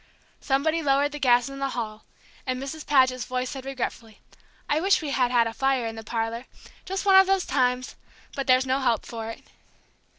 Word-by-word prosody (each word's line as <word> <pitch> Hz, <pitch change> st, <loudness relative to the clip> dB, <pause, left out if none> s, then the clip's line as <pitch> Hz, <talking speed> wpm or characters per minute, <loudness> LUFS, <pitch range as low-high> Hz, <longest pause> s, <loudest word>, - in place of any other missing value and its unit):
Somebody 310 Hz, +4 st, 0 dB
lowered 285 Hz, 0 st, +2 dB
the 295 Hz, -, -6 dB
gas 245 Hz, -2 st, +4 dB
in 275 Hz, 0 st, -8 dB
the 275 Hz, 0 st, -1 dB
hall, 215 Hz, -2 st, -5 dB, 0.4 s
and 255 Hz, 0 st, -1 dB
Mrs. 280 Hz, +3 st, -7 dB
Paget's 255 Hz, -3 st, +3 dB
voice 255 Hz, 0 st, -3 dB
said 265 Hz, -1 st, -7 dB
regretfully, 235 Hz, -4 st, -5 dB, 0.5 s
"I 300 Hz, +2 st, +1 dB
wish 390 Hz, +2 st, +3 dB
we 290 Hz, -, -3 dB
had 250 Hz, -3 st, +2 dB
had 240 Hz, -2 st, +3 dB
a 225 Hz, -, -3 dB
fire 270 Hz, -1 st, +1 dB
in 225 Hz, -, -3 dB
the 225 Hz, 0 st, -8 dB
parlor 230 Hz, +2 st, -3 dB, 0.4 s
just 385 Hz, +1 st, -3 dB
one 385 Hz, -1 st, +7 dB
of 385 Hz, 0 st, +7 dB
the 390 Hz, 0 st, +3 dB
times! 255 Hz, -1 st, 0 dB, 0.4 s
but 275 Hz, -, -3 dB
there's 255 Hz, 0 st, +4 dB
no 260 Hz, +1 st, +1 dB
help 240 Hz, -4 st, 0 dB
for 225 Hz, -1 st, -6 dB
it." 225 Hz, -, -9 dB
260 Hz, 200 wpm, -25 LUFS, 240-280 Hz, 0.5 s, one